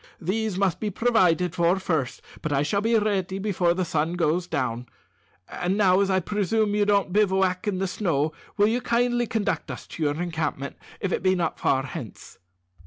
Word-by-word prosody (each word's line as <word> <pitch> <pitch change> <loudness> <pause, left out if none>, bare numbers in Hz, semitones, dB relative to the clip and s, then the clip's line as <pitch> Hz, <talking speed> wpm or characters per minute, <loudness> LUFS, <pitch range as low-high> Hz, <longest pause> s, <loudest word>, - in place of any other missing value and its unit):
"These 205 +2 -1
must 195 -3 +1
be 215 - -2
provided 180 -6 +2
for 170 +2 +2
first, 160 -8 -2 0.2
but 155 - -3
I 140 0 +2
shall 200 +7 0
be 230 +2 +2
ready 195 -3 0
before 190 -4 +1
the 185 0 0
sun 160 +1 0
goes 175 +1 0
down. 125 -5 -2 0.6
And 180 +3 -2
now, 190 -3 +4
as 200 -1 +2
I 190 -1 +3
presume 210 +2 0
you 205 0 +2
don't 200 -3 +2
bivouac 190 -1 +2
in 200 -3 0
the 190 - 0
snow, 165 -6 0 0.3
will 205 - +5
you 235 +3 0
kindly 240 0 +1
conduct 220 -2 -1
us - - -7
to - - -10
your 150 0 0
encampment, 160 -5 -3 0.3
if 195 - -1
it - - 0
be 185 0 +3
not 170 -3 -2
far 135 0 +2
hence?" 125 -7 -9
185 Hz, 190 wpm, -25 LUFS, 165-205 Hz, 0.6 s, will